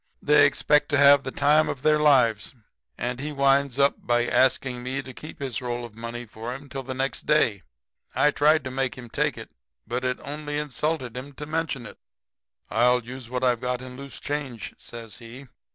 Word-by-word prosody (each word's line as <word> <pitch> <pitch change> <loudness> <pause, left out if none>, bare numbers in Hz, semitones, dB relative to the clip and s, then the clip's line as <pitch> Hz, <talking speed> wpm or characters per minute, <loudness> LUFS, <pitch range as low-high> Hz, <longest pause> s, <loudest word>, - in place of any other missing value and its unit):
They 145 -1 +5
expect 145 +1 +2
to 145 - +2
have 140 0 +7
the 135 - -5
time 150 +3 +3
of 130 - -5
their 155 0 +4
lives, 130 -6 +3 0.4
and 125 +1 -3
he 150 +3 -4
winds 140 -2 +2
up 140 0 +3
by 120 0 +1
asking 130 -1 +2
me 130 +2 -3
to 130 - -10
keep 155 +5 -10
his 135 -4 -3
roll 120 -1 -3
of 115 - -12
money 115 +2 -6
for 115 +3 -6
him 140 +1 -11
till 135 +1 -5
next 130 +1 -3
day. 115 -10 +3 0.5
I 150 - +4
tried 155 +2 +3
to 130 - -5
make 130 -1 -2
him 120 -2 -10
take - - 0
it, - - -9 0.3
but 120 +2 -3
it 125 -1 0
only 145 +1 -5
insulted 150 -3 -2
him 135 +3 -7
to 150 - -7
mention 155 -5 -2
it. - - -12 0.7
"'I'll 125 0 +3
use 125 0 -9
what 125 0 -3
I've 125 -2 +2
got 125 0 -1
in 125 -1 -9
loose 140 +1 -9
change,' 140 -6 -4
says 115 -3 -10
he. 120 +3 -11
130 Hz, 200 wpm, -25 LUFS, 120-145 Hz, 0.7 s, have